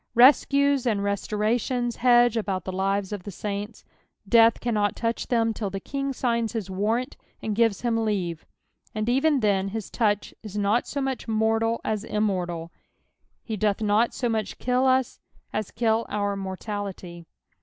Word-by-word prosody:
Rescues 280 +1 +5
and 205 -4 +1
restorations 220 +4 -1
hedge 240 -1 +5
about 195 -5 -2
the 185 - -3
lives 195 +1 -1
of 205 -2 -4
the 205 - -8
saints; 205 +3 -5 0.4
death 230 +1 +5
cannot 210 -4 0
touch 230 0 -2
them 230 -2 +1
till 210 -2 -3
the 195 +1 -4
King 275 +6 -3
signs 235 -3 -1
bis 215 -5 -4
warrant 225 +7 -1 0.3
and 215 -2 -2
gives 225 -3 +2
him 230 -2 0
leave, 180 -7 -2 0.5
and 215 0 -1
eren 270 +4 +2
then 195 -2 +2
his 215 +1 -5
touch 205 -3 0
is 210 -2 -7
not 205 +4 +1
so 285 - -3
mucli 265 -2 -3
mortal 225 +1 +1
as 215 -1 -2
immortal; 180 -6 -2 0.7
he 220 - -4
doth 210 -1 0
not 215 +2 +2
so 245 - -2
much 220 -3 -2
kill 250 +1 +1
us 260 -1 +1 0.3
as 215 -2 -2
kill 225 -1 0
out 205 -1 -1
mortiality. 190 -3 -6
220 Hz, 160 wpm, -25 LUFS, 200-235 Hz, 0.7 s, Rescues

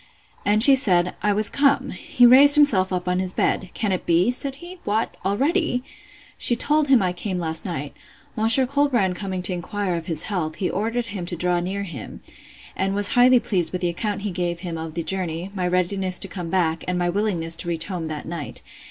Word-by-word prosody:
And 210 +2 +5
she 275 - +10
said, 180 -9 +2
I 210 - +1
was 210 +1 +1
come. 280 0 +2
He 245 - +1
raised 275 +4 +8
himself 215 -11 +3
up 180 -1 -3
in 180 0 0
his 185 -1 -3
bed; 190 - -1
Can 210 -3 -1
it 185 - -3
be? 175 +7 +3
said 270 +2 -1
he—What, 290 - -4
already!—She 255 - -2
told 300 +4 +1
him 265 -6 +4
I 180 -1 -1
came 185 +1 -4
last 160 -2 0
night. 145 -6 -5 0.4
Monsieur 225 +4 +3
Colbrand 250 -9 0
coming 185 -1 -4
to 185 - +5
inquire 180 +1 -3
of 165 -1 -6
his 160 -3 -3
health, 165 -6 -3
he 185 - -2
ordered 230 +4 -2
him 180 -4 -5
to 175 - -3
draw 175 +1 0
near 190 +3 -4
him, 160 - -9 0.5
and 195 +1 -1
was 205 0 +1
highly 250 0 +5
pleased 180 -7 -1
with 180 - -4
the 175 - 0
account 200 +4 -3
he 205 - -3
gave 175 -1 -3
him 175 -3 -5
of 160 -1 -7
the 170 - -3
journey, 180 0 -2
my 185 -3 -2
readiness 185 +1 0
to - - -2
come 175 -2 -6
back, 165 -3 0
and 180 0 -1
my 175 0 0
willingness 175 -4 -1
to 175 - -4
reach 165 -2 -1
home 180 -4 -5
that 155 -1 -6
night. 165 -4 -6
190 Hz, 210 wpm, -22 LUFS, 175-225 Hz, 0.5 s, she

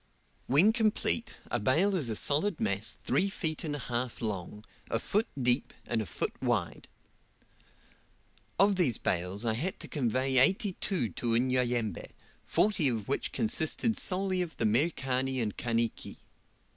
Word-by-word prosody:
When 170 - +5
complete, 225 0 +2
a 120 - +1
bale 160 - +2
is 145 -10 -1
a 110 - -2
solid 155 - 0
mass 100 0 -1
three 195 +2 +1
feet 160 -6 -2
and 150 -3 -2
a 145 - -5
half 120 0 -2
long, 105 -1 -4 0.2
a - - +1
foot 210 - +1
deep, 125 +1 +1
and 115 -2 -1
a 105 - -5
foot - - -2
wide. 110 -11 -1 1.7
Of 195 0 +4
these 140 - +2
bales 90 +5 -2
I 110 - +1
had 160 +12 -3
to - - -5
convey 130 -1 +1
eighty 190 - +3
two 180 - 0
to 115 +6 -1
Unyanyembe, 120 -4 0 0.3
forty 195 -8 +2
of 115 -5 -2
which 140 - -1
consisted 220 +2 +1
solely 185 0 0
of 175 -2 -5
the 115 - 0
Merikani 130 +1 0
and 110 -4 -2
Kaniki. 115 -1 -2
130 Hz, 150 wpm, -30 LUFS, 115-180 Hz, 1.7 s, When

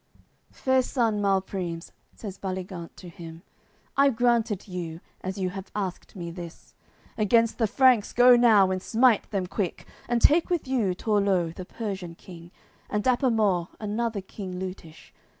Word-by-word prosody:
AOI. - - -43
CCXXXI - - -32
"Fair 260 0 +2
son 230 -5 0
Malprimes," 190 -4 -1 0.2
says 200 -4 -8
Baligant 185 -3 -5
to 180 - -11
him, 165 0 -10 0.5
"I 280 0 +5
grant 240 -2 +2
it 210 -2 -5
you, 170 -3 -5 0.2
as 190 +2 -4
you 185 -2 -1
have 195 0 -8
asked 195 -2 -4
me 170 -3 -6
this; 170 -1 -10 0.5
Against 230 +3 +3
the 225 - +3
Franks 255 -1 +4
go 245 +1 +7
now, 215 -6 +5
and 185 0 -2
smite 230 +1 +3
them 195 -3 -1
quick. 190 -1 -3 0.2
And 240 -1 +2
take 320 +9 +4
with 345 -6 -1
you 225 -9 +1
Torleu, 195 -5 +1
the 185 - -8
Persian 190 -6 -5
king 170 -1 -12 0.4
And 210 0 -1
Dapamort, 220 -9 +2
another 215 0 -2
king 190 -1 -7
Leutish. 185 -4 -8
200 Hz, 160 wpm, -26 LUFS, 180-230 Hz, 0.5 s, go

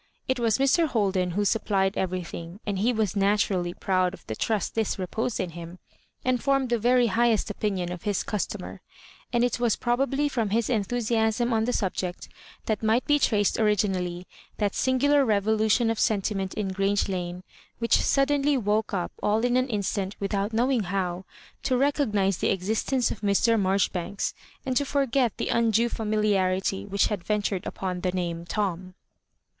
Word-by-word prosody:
It 260 -1 0
was 230 -3 +2
Mr. 275 +5 +3
Hol 215 -8 +1
den 185 -1 0
who 205 - +1
supplied 195 -2 +1
everything, 180 -1 -4
and 200 -3 -2
he 230 +5 +2
was 215 -4 -1
natur 205 +1 +2
ally 175 -1 -1
proud 185 -1 +1
of - - -21
the - - -4
trust 215 - -1
thus 225 -2 -1
reposed 220 +5 -2
in 180 -3 -2
him, 170 +1 -9 0.5
and 255 -2 +1
formed 275 -2 +1
the 235 - +2
very 245 +2 +4
highest 230 0 +2
opinion 195 -4 -2
of 180 -2 -6
his 205 -3 -1
customer; 210 -3 -4 0.5
and 240 -1 +2
it 245 0 0
was 240 -3 +2
probably 270 +4 0
from 235 -7 -1
his 225 +3 0
enthusiasm 230 +1 0
on 220 0 +2
the 250 - 0
subject 185 -4 -3 0.4
that 215 -2 -1
might 225 +3 +2
be 295 -1 +3
traced 205 -6 +2
originally 185 -4 0 0.3
that 205 -2 0
sin 260 0 +1
gular 285 +2 +4
revolution 220 +1 +2
of 225 - -3
sentiment 195 -2 0
in 205 -3 -2
Grange 195 +1 +1
Lane, 180 -1 -4 0.3
which 230 0 +2
suddenly 285 0 +2
woke 210 -2 0
up 180 -2 -2
siU 215 +2 +1
in 245 0 +1
an 255 +1 +2
instant 200 -2 -2
with 200 0 -3
out 200 +2 0
knowing 240 -1 +1
how, 185 -1 -2 0.4
to 255 - +1
recognise 215 - +1
the - - +1
existence 220 +7 0
of - - -6
Mr. 215 +2 +3
Marjoribanks, 195 -1 0 0.3
and 260 -1 -1
to 285 - +3
forget 270 -4 +1
the - - -2
undue 230 0 +2
familiarity 200 -4 0
which 200 0 +2
had 205 -5 -3
ventured 205 -3 -1
upon 180 -2 -4
the 185 - 0
name 170 -2 -3
Tom. 185 -1 -3
210 Hz, 175 wpm, -26 LUFS, 190-240 Hz, 0.5 s, very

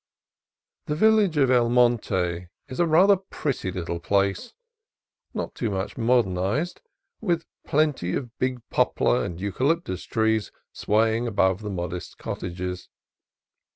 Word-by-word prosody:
The 150 - -1
village 215 -3 +4
of 135 -3 +4
El 120 -2 +4
Monte 100 -8 +1 0.2
is 130 - -8
a 170 - +3
rather 185 +6 +6
pretty 145 - -3
little 85 -2 -4
place, 100 - 0 0.8
not - - -4
too 115 - -2
much 95 -1 -3
modernized, 115 - +1 0.4
with 170 -6 -1 0.2
plenty 145 - +1
of 120 -3 -5
big 130 -2 -2
poplar - - +2
and 85 +5 -5
eucalyptus 100 - -1
trees 110 -2 0 0.2
swaying 110 +3 +1
above 95 -3 +1
the 105 - -5
modest 90 -2 -5
cottages. 90 0 -5
115 Hz, 120 wpm, -25 LUFS, 95-145 Hz, 0.8 s, rather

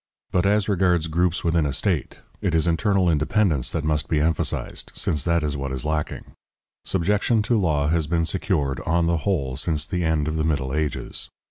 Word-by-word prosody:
But 90 +1 +2
as 105 0 +2
regards 90 -5 +2
groups 85 +2 0
within 85 -1 +2
a 70 - -2
state, 85 0 -1 0.2
it 85 -4 0
is 80 - +2
internal 95 +3 +2
independence 80 - +2
that 80 - -3
must 75 -1 0
be 80 - +2
emphasized, 80 +1 -1
since 75 -4 -1
that 85 -1 +2
is 75 -1 -1
what 70 -1 -4
is 65 0 -3
lacking; 75 -1 -3 0.5
subjection 105 +4 +1
to 115 +1 +2
law 75 -6 +1
has 80 -1 +1
been 85 +1 +1
secured, 80 -7 -1
on 85 +1 +2
the 85 0 +2
whole, 70 -7 -1
since 75 -1 0
the 90 +2 -2
end 80 -2 +1
of 80 0 -1
the 80 - 0
Middle 70 -4 -1
Ages. 75 0 -2
80 Hz, 195 wpm, -23 LUFS, 75-90 Hz, 0.5 s, But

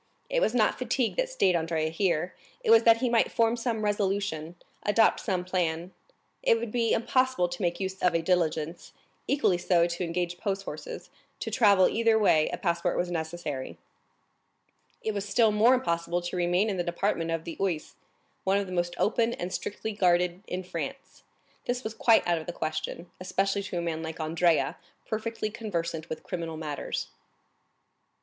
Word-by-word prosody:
It - - +2
was 225 - +2
not 220 -3 +2
fatigue 250 -1 0
that - - +1
stayed 190 - +2
Andrea 160 -1 0
here; 170 0 0 0.3
it 450 - +3
was 455 - +8
that 230 0 +6
he 255 - +2
might 235 -2 +2
form 230 0 +2
some 230 -2 -2
resolution, 195 -5 -1 0.3
adopt 220 +2 +3
some 185 -4 -2
plan. 175 -1 -1 0.5
It 230 - +4
would 225 -1 -4
be 230 -1 +1
impossible 255 -4 +2
to 175 +3 -6
make 175 -1 0
use 190 0 -4
of 180 -2 +3
a 165 - +1
diligence, 165 -2 -1 0.3
equally 235 -11 +2
so 175 -1 +3
to 170 +1 -3
engage 175 +1 -2
post 195 -1 -2
horses; 485 - -7 0.3
to - - -3
travel 200 -6 +5
either 225 0 +3
way 160 -8 +4
a - - -3
passport 175 0 0
was 175 0 -1
necessary. 160 -5 -4 1.3
It 220 - -1
was 200 0 -4
still 220 +1 +4
more 225 +5 +5
impossible 170 -7 -1
to 175 - -4
remain 180 +3 +2
in 190 - -3
the 175 - 0
department 175 -1 -1
of 165 -1 -1
the 165 - -6
Oise, 175 -6 -1 0.5
one 195 +1 +2
of 200 - 0
the 185 - -7
most 175 -1 -1
open 230 +2 +2
and 180 -3 -5
strictly 220 +2 -4
guarded 180 -2 +2
in 185 +1 -3
France; 230 +10 -6 0.4
this 245 +1 -2
was 220 - -4
quite 225 0 +4
out 170 -1 +2
of 160 - -10
the 175 - -4
question, 155 +2 -4
especially 195 +2 0
to 195 -3 -5
a - - 0
man 165 -1 -2
like 160 0 -6
Andrea, 160 +1 +2 0.3
perfectly 220 0 -3
conversant 170 -8 -4
with 160 - -5
criminal 165 -3 -4
matters. 150 -3 -4
185 Hz, 180 wpm, -28 LUFS, 170-220 Hz, 1.3 s, was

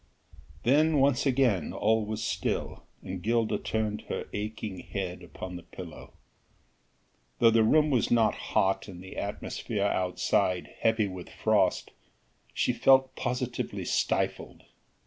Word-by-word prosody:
Then 150 +5 +4
once 135 0 +3
again 125 - +2
all 110 +1 +2
was 110 +1 -4
still, - - -2 0.2
and 95 -1 -5
Gilda 115 +2 +1
turned 110 -1 -2
her - - -3
aching 105 -2 -4
head 95 -2 -5
upon 90 +1 -8
the - - -9
pillow. 85 -2 -11 1.2
Though 115 - +5
the 115 0 +4
room 150 +6 +4
was 125 -5 +2
not 115 -2 +4
hot, 95 0 0
and 90 -2 -10
the 95 - -10
atmosphere 100 +1 -3
outside 90 -1 0
heavy 110 -2 +2
with 95 -2 -8
frost, - - +1 0.6
she 125 - +1
felt 130 +2 +4
positively 125 -1 -3
stifled. - - -1
110 Hz, 125 wpm, -28 LUFS, 95-120 Hz, 1.2 s, Though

